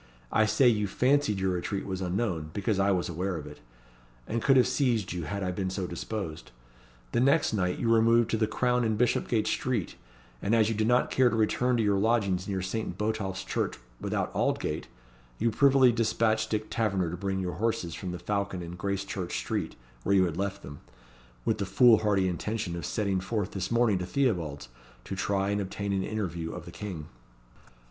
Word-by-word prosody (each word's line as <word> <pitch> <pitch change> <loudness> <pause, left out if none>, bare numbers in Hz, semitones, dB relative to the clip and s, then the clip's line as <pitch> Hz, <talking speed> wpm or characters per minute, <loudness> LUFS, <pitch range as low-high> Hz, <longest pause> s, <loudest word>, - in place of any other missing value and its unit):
I 110 0 +3
say, 130 +4 +4
you 105 -3 +3
fancied 125 0 +2
your 95 0 +1
retreat 90 +2 -2
was 95 -1 -4
unknown, 90 -4 -1
because 100 0 0
I 100 +1 +3
was 90 -3 +1
aware 90 +2 -2
of 75 - -7
it, 75 0 -11 0.7
and 115 +1 -2
could 135 +2 +5
have 125 - +6
seized 120 -6 0
you 85 -3 -4
had 100 +6 -3
I 90 - -1
been 95 +1 -2
so 95 0 -3
disposed. 85 - -5 0.6
The - - +1
next 140 +1 +3
night 90 -3 0
you 115 - -1
removed 115 0 +4
to 110 - +2
the 110 -1 +1
Crown 125 +2 +1
in 110 -1 +1
Bishopgate 115 -1 +1
Street, 110 -2 -1 0.4
and 110 +4 +2
as 110 -1 +4
you - - 0
did 110 0 0
not 125 +1 +3
care 130 -2 +4
to 120 - -2
return 120 +3 +2
to 115 - +2
your 100 -2 +2
lodgings 100 -4 +1
near 95 -2 -2
Saint 110 +4 -3
Botolph's 105 -3 -2
Church - - -2 0.2
without - - -2
Aldgate, - - -1 0.5
you 115 +1 +1
privily 135 +1 +5
despatched 110 -1 +1
Dick 110 0 -2
Taverner 95 -7 0
to - - -3
bring 95 +1 -2
your 90 -1 -2
horses 105 -6 -1
from 95 - -5
the 90 - -4
Falcon 100 -2 -2
in 85 +1 -7
Gracechurch 100 -2 -3
Street, - - -3 0.3
where 100 - +2
you 95 -1 +5
had 85 -3 -3
left 100 +1 -3
them, 70 0 -9 0.7
with - - +1
the - - 0
foolhardy 105 -5 +4
intention 95 +1 -3
of 85 -4 -4
setting 100 -3 0
forth 100 +1 -2
this 95 -2 -3
morning 115 -5 +3
to 90 - -4
Theobalds, 85 - -1 0.4
to 95 - -5
try 95 +1 0
and 100 0 0
obtain 100 +1 -3
an 95 - +1
interview 85 -6 -3
of - - -7
the - - -9
King." 90 -8 -6
100 Hz, 200 wpm, -28 LUFS, 95-115 Hz, 0.7 s, have